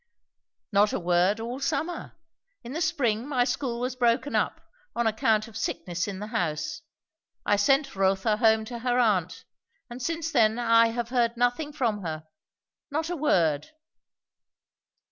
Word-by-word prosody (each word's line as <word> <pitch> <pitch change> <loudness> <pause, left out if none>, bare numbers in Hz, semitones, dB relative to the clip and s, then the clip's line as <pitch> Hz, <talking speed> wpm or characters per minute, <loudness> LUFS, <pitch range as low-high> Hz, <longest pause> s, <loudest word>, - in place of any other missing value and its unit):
"Not 205 +1 +3
a - - 0
word 180 +4 +2
all 240 +3 -5
summer. 315 +5 -3 0.5
In 240 - -8
the 325 - -3
spring 260 -8 0
my 260 -4 +2
school 250 -1 -2
was 250 +1 -2
broken 250 +3 +1
up, - - 0 0.4
on 235 - 0
account 220 0 +2
of 225 - -14
sickness 180 -5 -3
in 200 -2 -5
the 205 - -5
house; 155 - -2 0.6
I 205 - +3
sent 270 +6 +2
Rotha 195 +2 +1
home 220 -1 +3
to 235 +1 -6
her 245 +1 0
aunt; 185 -8 +1 0.5
and 245 +2 -7
since 325 +3 -2
then 225 -5 +3
I 230 -1 +5
have 235 0 -3
heard 240 -2 +1
nothing 245 +5 0
from 235 -8 -1
her. 155 -3 -5 0.6
Not 315 +3 -2
a - - -1
word." 165 - +1
230 Hz, 155 wpm, -27 LUFS, 205-260 Hz, 0.6 s, I